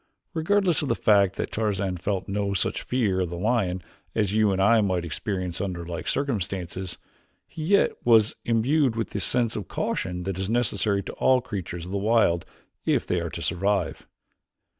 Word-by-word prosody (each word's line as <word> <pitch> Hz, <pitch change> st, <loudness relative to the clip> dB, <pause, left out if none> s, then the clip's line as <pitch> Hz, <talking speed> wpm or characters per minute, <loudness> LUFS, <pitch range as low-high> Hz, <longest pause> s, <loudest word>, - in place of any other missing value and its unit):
Regardless 180 Hz, +1 st, +2 dB
of 150 Hz, -, -2 dB
the -, -, +2 dB
fact 100 Hz, -3 st, +3 dB
that -, -, -3 dB
Tarzan 100 Hz, -4 st, -1 dB
felt 95 Hz, +1 st, -2 dB
no 100 Hz, 0 st, -1 dB
such 95 Hz, -, -1 dB
fear 110 Hz, -7 st, 0 dB
of 90 Hz, -, -1 dB
the 85 Hz, -, -5 dB
lion 95 Hz, -3 st, 0 dB, 0.3 s
as 105 Hz, -3 st, +1 dB
you 110 Hz, -1 st, +3 dB
and 95 Hz, -, 0 dB
I 110 Hz, +3 st, +5 dB
might 90 Hz, -4 st, 0 dB
experience 90 Hz, +1 st, -3 dB
under 90 Hz, -4 st, -3 dB
like 85 Hz, -1 st, -5 dB
circumstances, 95 Hz, -7 st, -2 dB, 0.5 s
he 155 Hz, -, -7 dB
yet 200 Hz, +4 st, +4 dB
was 110 Hz, -3 st, +5 dB
imbued 125 Hz, +3 st, +2 dB
with 115 Hz, -1 st, -2 dB
the 100 Hz, -, -2 dB
sense 120 Hz, +2 st, +1 dB
of 105 Hz, -, -4 dB
caution 90 Hz, -1 st, -2 dB
that 95 Hz, 0 st, -3 dB
is 95 Hz, +1 st, -2 dB
necessary 105 Hz, -4 st, +1 dB
to -, -, -7 dB
all 130 Hz, -1 st, +3 dB
creatures 90 Hz, -8 st, -5 dB
of 90 Hz, -, -8 dB
the 100 Hz, -, -1 dB
wild 105 Hz, -5 st, +2 dB, 0.4 s
if -, -, +1 dB
they 90 Hz, -, 0 dB
are 85 Hz, 0 st, -3 dB
to 85 Hz, -, -6 dB
survive. 95 Hz, 0 st, -1 dB
100 Hz, 185 wpm, -26 LUFS, 90-115 Hz, 0.5 s, I